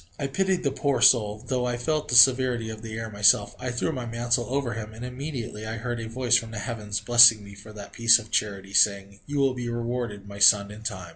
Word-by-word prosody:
I 140 - -4
pitied 185 +6 -1
the 140 - 0
poor 140 -1 -2
soul; 105 -3 +3
though 125 -2 -2
I 120 -1 -3
felt 150 +5 -3
the 120 - -2
severity 125 -2 +4
of 110 -1 -10
the 110 -1 -8
air 115 -1 -6
myself, 105 +1 +2
I 130 - -5
threw 125 +6 -2
my 125 -5 -6
mantle 120 +1 -1
over 135 -2 -2
him, 110 -1 -8
and 120 +3 -8
immediately 125 -4 -7
I 110 +1 -5
heard 120 +1 -5
a 115 -1 -7
voice 120 +1 +1
from 115 -1 0
the 110 - -9
heavens, 105 -2 -5
blessing 120 -3 +6
me 100 0 -13
for 105 +2 -14
that 105 -1 -11
piece 115 -1 +5
of 110 -2 -11
charity, 100 -2 -3
saying: 100 0 +1
"You 145 0 -5
will 135 -2 +1
be 120 -1 -6
rewarded, 120 -3 -5
my 100 0 -10
son, 100 0 +5
in 105 +1 -12
time." 95 -5 -6
115 Hz, 240 wpm, -24 LUFS, 105-125 Hz, -, blessing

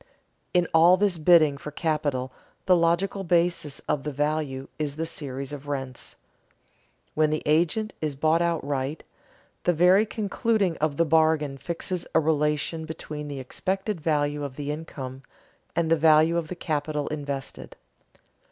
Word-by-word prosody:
In 180 -1 +2
all 170 +3 +7
this 195 -4 +1
bidding 155 -3 +5
for 150 - -6
capital 145 -4 -1 0.3
the 185 - +5
logical 175 +4 +1
basis 170 -4 +1
of 145 - -1
the 150 - -4
value 145 -2 -2
is 145 -2 -2
the 160 +1 -2
series 140 -3 -5
of 145 0 -8
rents. 135 -3 -5 1.0
When 155 0 +2
the 155 0 -2
agent 170 +8 +1
is 150 -3 -2
bought 155 +4 +2
outright, 145 -4 -1 0.6
the 175 - +3
very 180 +6 +5
concluding 210 -3 0
of 150 -2 -1
the 170 - +3
bargain 155 -2 +2
fixes 170 +2 -4
a - - +7
relation 150 +1 0
between 150 -2 -7
the 140 -2 -5
expected 190 - -3
value 145 -2 0
of 140 -2 -5
the 145 0 -4
income 135 -4 -7 0.5
and 165 -1 0
the - - +7
value 155 +1 +5
of 170 -2 -1
the 180 - -6
capital 150 -2 -2
invested. 140 -2 -5
155 Hz, 150 wpm, -26 LUFS, 145-170 Hz, 1.0 s, all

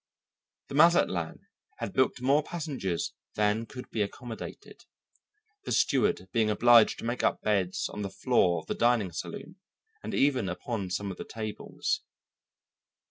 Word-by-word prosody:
The - - -7
Mazatlan 145 - +3 0.3
had 100 - -5
booked 130 -1 +1
more 140 +3 +4
passengers 145 - -3 0.2
than 105 +2 +1
could 125 -3 -9
be 110 - -1
accommodated, 115 +3 -6 0.8
the - - -5
steward 210 - +2
being 110 0 +2
obliged 115 +2 +6
to - - -7
make 120 +2 -1
up - - +1
beds 95 -4 0
on 105 - -7
the 100 - -3
floor 95 -3 +2
of - - -20
the - - -2
dining 120 -6 +2
saloon 160 - -7 0.4
and - - -4
even 130 -8 +2
upon 100 +1 -4
some 100 +2 -2
of 95 - -8
the - - -5
tables. 110 -2 -3
110 Hz, 145 wpm, -29 LUFS, 100-130 Hz, 0.8 s, obliged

